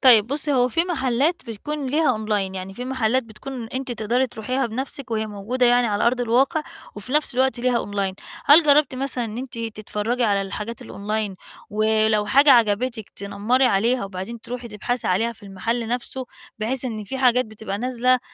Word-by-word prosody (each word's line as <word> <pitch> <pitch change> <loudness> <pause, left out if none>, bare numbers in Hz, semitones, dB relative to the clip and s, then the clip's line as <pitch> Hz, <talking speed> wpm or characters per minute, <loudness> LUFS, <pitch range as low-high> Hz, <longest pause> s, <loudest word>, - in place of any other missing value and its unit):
طيب 230 -6 +7
بُصّي، 285 +3 -1
هو 250 -1 +3
في 330 +6 +1
محلات 295 -1 0
بتكون 280 +6 -4
ليها 280 -3 +2
online، 200 -3 0
يعني 190 +1 -6
في 250 - -5
محلات 255 -1 +1
بتكون 230 +1 -8
أنتِ 260 0 -4
تقدري 235 +4 +1
تروحيها 255 +3 -2
بنفسِك، 260 +2 -5
وهي 220 -1 0
موجودة 215 +5 0
يعني 245 0 +4
على 205 +1 +1
أرض 245 +1 +2
الواقع، 265 +7 +2 0.3
وفي 210 +6 -6
نفس 300 -4 +1
الوقت 260 0 +2
ليها 245 -1 +1
online 200 -2 -2 0.3
هل 310 +4 +8
جربتِ 290 -1 +4
مثلًا 255 -2 -1
إن 225 +1 -5
أنتِ 250 -2 -7
تتفرجي 225 +1 -2
على 200 -2 +2
الحاجات 210 +4 -6
الonline 210 -1 -3 0.4
ولو 215 0 +2
حاجة 280 +7 +6
عجبتِك، 230 -1 +3
تنمّري 200 +6 +1
عليها، 230 +4 +2
وبعدين 195 +4 -6
تروحي 245 +1 -6
تبحثي 235 +3 -2
عليها 220 +6 +1
في 230 - -21
المحل 220 +4 -3
نفسه، 250 +1 -3 0.3
بحيث 245 +4 -1
إن 220 -4 -4
في 265 +7 -5
حاجات 250 -1 +4
بتبقى 215 -2 -6
نازلة 255 +1 +2
235 Hz, 175 wpm, -23 LUFS, 215-255 Hz, 0.4 s, هل